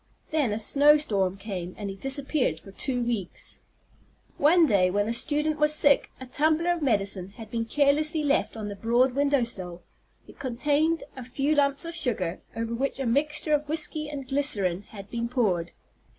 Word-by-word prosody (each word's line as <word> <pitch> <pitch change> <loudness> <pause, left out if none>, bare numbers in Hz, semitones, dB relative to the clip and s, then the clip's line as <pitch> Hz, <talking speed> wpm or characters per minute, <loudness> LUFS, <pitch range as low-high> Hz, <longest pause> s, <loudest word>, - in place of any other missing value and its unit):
Then 295 -8 +1
a 210 - -1
snow 285 +7 +5
storm 195 -10 0
came, 190 -3 -6
and 205 - -5
he - - -8
disappeared 270 - 0
for 195 - -14
two 245 +4 -1
weeks. 230 -7 -4 0.8
One 330 +4 +5
day, 195 -8 +3
when 205 +2 0
a 230 - -1
student 300 +4 0
was 300 0 +4
sick, 285 -2 +4
a 260 - -8
tumbler 315 +6 +1
of 345 -1 -2
medicine 200 -8 0
had 220 -2 -10
been 230 -1 -2
carelessly 295 +4 +2
left 285 -5 0
on 215 -2 -5
the 205 - -6
broad 240 +5 +2
window 280 -1 +2
sill. 180 -6 -4 0.4
It - - -16
contained 290 +5 0
a 260 - -7
few 275 +4 -1
lumps 280 0 +1
of 335 - -5
sugar, 225 - -1
over 230 0 -3
which 270 +4 -2
a 270 - -2
mixture 300 +5 +1
of 295 0 0
whiskey 305 -1 0
and 280 -3 -7
glycerine 205 -10 0
had 200 -2 -11
been 235 0 -3
poured. 190 -9 0
260 Hz, 180 wpm, -26 LUFS, 210-295 Hz, 0.8 s, snow